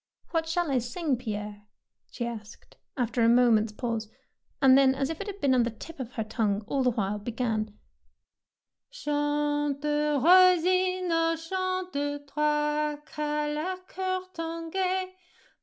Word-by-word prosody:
''What 325 -1 0
shall 330 -2 0
I 260 - +3
sing, 265 +5 -1
Pierre?" 210 -3 -5 0.5
she 240 - -4
asked, 220 -2 -9 0.2
after 240 -1 0
a 230 - +5
moment's 230 -3 +4
pause, 225 -1 -3 0.5
and 265 -2 +7
then, 270 -1 +5
as 270 +2 -1
if 325 - -6
it 405 - -5
had 400 -1 -6
been 275 -5 +3
on 255 - +4
the 235 - +1
tip 285 +8 -11
of 250 -1 -6
her 225 - -2
tongue 215 -2 -1
all 275 +5 -1
the 255 - +3
while, 210 -3 -1
began, 220 -1 -2 0.5
— - - -63
Chante, 295 0 -1 0.3
rossignol, 365 +1 +4
chante, 330 -5 -3
Toi 300 +1 0
qu'as 300 0 -2
le 365 +5 -2
coeur 370 0 -2
tant 330 0 -5
gai. 370 0 0
290 Hz, 145 wpm, -28 LUFS, 240-330 Hz, 0.5 s, and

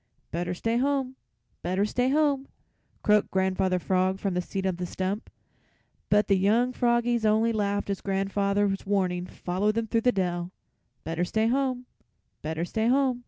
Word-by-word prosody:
"Better 175 +2 -2
stay 230 +6 0
home, 265 0 0 0.5
better 185 +3 0
stay 245 +4 0
home," 280 -2 +2 0.6
croaked 210 -1 +3
Grandfather 190 -1 +1
Frog 185 +1 +1
from 195 -1 -2
his 180 0 -1
seat 195 -1 -3
on 185 -2 0
the 180 0 -3
stump, 190 +4 -3 0.8
but 210 0 +4
the 195 -2 +3
young 230 +6 +2
froggies 240 -1 +1
only 220 +2 +3
laughed 205 -1 -1
as 200 -1 -3
grandfather's 200 0 0
warning 185 -3 0
followed 195 +4 -1
them 230 0 0
through 225 +1 0
the 250 - +4
dell 175 -3 -2 0.5
"Better 165 +2 -2
stay 220 +5 0
home, 255 +1 0 0.6
better 160 +2 -2
stay 220 +5 -1
home." 260 -1 +2
205 Hz, 160 wpm, -27 LUFS, 185-235 Hz, 0.8 s, but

